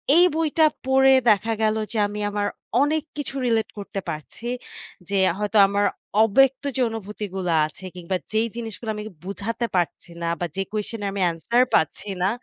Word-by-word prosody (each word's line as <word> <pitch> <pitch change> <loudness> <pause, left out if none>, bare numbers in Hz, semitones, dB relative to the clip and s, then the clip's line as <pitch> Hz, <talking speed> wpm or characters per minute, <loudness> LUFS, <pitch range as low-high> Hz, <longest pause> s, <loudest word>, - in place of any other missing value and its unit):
এই 350 - +7
বইটা 320 0 +3 0.2
পড়ে 265 0 +5 0.2
দেখা 220 +2 +3
গেল 215 0 +3 0.2
যে 230 - -3
আমি 210 +1 -6
আমার 205 0 -1 0.3
অনেক 305 +1 +2
কিছু 280 -1 -5
relate 225 -3 +1
করতে 200 0 -5
পারছি। 155 +9 -7 0.6
যে 200 - -1 0.2
হয়তো 210 +1 0
আমার 200 +1 +1 0.4
অব্যক্ত 270 +5 +4
যে 260 - +1
অনুভূতিগুলো 200 -4 -4
আছে 155 +4 -11
কিংবা 180 +1 -3 0.2
যেই 220 +1 +2
জিনিসগুলো 225 -1 -6
আমি 210 - -6 0.2
বুঝাতে 225 +5 -3
পারছি 175 -1 -1
না 170 - -1
বা 175 - -1
যে 195 - -1
question 215 +1 -4
এর - - -2 0.2
answer 235 +9 +1
পাচ্ছি 160 +6 0
না 190 - +3
215 Hz, 165 wpm, -24 LUFS, 195-240 Hz, 0.6 s, এই